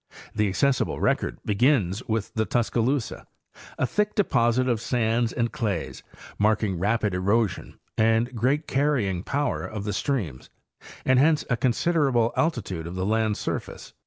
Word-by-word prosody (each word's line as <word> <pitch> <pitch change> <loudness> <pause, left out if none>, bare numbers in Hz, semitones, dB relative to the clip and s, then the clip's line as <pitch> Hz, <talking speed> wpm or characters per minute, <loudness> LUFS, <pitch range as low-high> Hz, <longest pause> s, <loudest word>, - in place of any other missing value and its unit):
The 105 -1 +1
accessible 135 +7 +1
record - - 0
begins 105 -2 +2
with 110 -2 -2
the 110 -1 0
Tuscaloosa, 120 +2 -1 0.5
a - - +1
thick 210 +9 -1
deposit 125 - +2
of 120 -3 0
sands 115 -1 0
and 120 -1 -1
clays 100 -7 -3 0.4
marking 105 -3 +1
rapid 105 +1 +1
erosion 100 +1 0 0.2
and 115 +3 +2
great 135 +7 +1
carrying 130 -11 0
power 145 +8 -1
of 105 -2 -5
the 105 0 -3
streams, 95 - -3 0.6
and 130 -1 +4
hence 155 +2 +3
a - - +4
considerable 130 -1 +1
altitude 100 - -1
of 85 - -7
the 95 0 -2
land 110 0 +1
surface. - - -5
115 Hz, 140 wpm, -25 LUFS, 105-130 Hz, 0.6 s, and